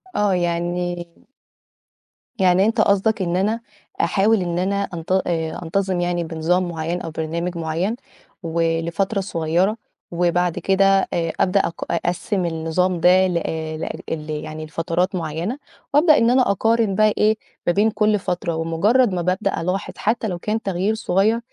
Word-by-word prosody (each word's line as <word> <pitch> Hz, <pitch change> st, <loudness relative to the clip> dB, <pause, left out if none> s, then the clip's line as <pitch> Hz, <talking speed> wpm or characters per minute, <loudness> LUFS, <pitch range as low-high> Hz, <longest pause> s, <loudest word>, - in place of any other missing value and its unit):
آه، 205 Hz, -2 st, +2 dB
يعني 175 Hz, 0 st, -1 dB, 1.3 s
يعني 185 Hz, 0 st, +4 dB
أنت 225 Hz, 0 st, +2 dB
قصدك 200 Hz, +1 st, +2 dB
إن 175 Hz, -1 st, -1 dB
أنا 215 Hz, +5 st, +1 dB, 0.4 s
أحاول 200 Hz, +4 st, +2 dB
إن 175 Hz, -1 st, -2 dB
أنا 200 Hz, +2 st, 0 dB
أنت 165 Hz, +1 st, -6 dB, 0.2 s
آآ 160 Hz, -2 st, -2 dB
أنتظم 185 Hz, +2 st, -1 dB
يعني 175 Hz, -1 st, 0 dB
بنظام 165 Hz, +3 st, 0 dB
معيّن 170 Hz, +2 st, -3 dB
أو 165 Hz, -, -6 dB
برنامج 170 Hz, +2 st, -3 dB
معيّن 165 Hz, +7 st, -1 dB, 0.5 s
ولفترة 165 Hz, +4 st, 0 dB
صغيرة 180 Hz, +3 st, 0 dB, 0.3 s
وبعد 175 Hz, 0 st, +1 dB
كده 195 Hz, 0 st, +3 dB
آآ 165 Hz, -1 st, -1 dB
أبدأ 195 Hz, +1 st, +3 dB
أق 165 Hz, -, -3 dB
أقسِّم 175 Hz, +2 st, -1 dB
النظام 170 Hz, +2 st, 0 dB
ده 185 Hz, +2 st, +5 dB
لأ 160 Hz, -3 st, -3 dB
لأ -, -, -3 dB, 0.2 s
ال 155 Hz, -1 st, -4 dB
يعني 155 Hz, +1 st, -5 dB
لفترات 170 Hz, +4 st, -1 dB
معيّنة 170 Hz, -, -3 dB, 0.4 s
وأبدأ 305 Hz, +1 st, +6 dB
إن 230 Hz, -, +3 dB
أنا 250 Hz, -3 st, +4 dB
أقارن 225 Hz, 0 st, +1 dB
بقى 215 Hz, 0 st, +4 dB
إيه، 215 Hz, +1 st, +3 dB, 0.3 s
ما 175 Hz, -, +4 dB
بين 210 Hz, +2 st, +3 dB
كل 210 Hz, -1 st, +2 dB
فترة 175 Hz, -2 st, -2 dB
ومُجرّد 190 Hz, +9 st, +2 dB
ما 175 Hz, -, -1 dB
بابدأ 185 Hz, -1 st, -1 dB
ألاحظ 180 Hz, +3 st, -2 dB
حتّى 220 Hz, +1 st, 0 dB
لو 180 Hz, -4 st, -4 dB
كان 215 Hz, +4 st, -2 dB
تغيير 195 Hz, +2 st, 0 dB
صغير، 220 Hz, +2 st, +1 dB
180 Hz, 150 wpm, -21 LUFS, 165-200 Hz, 1.3 s, وأبدأ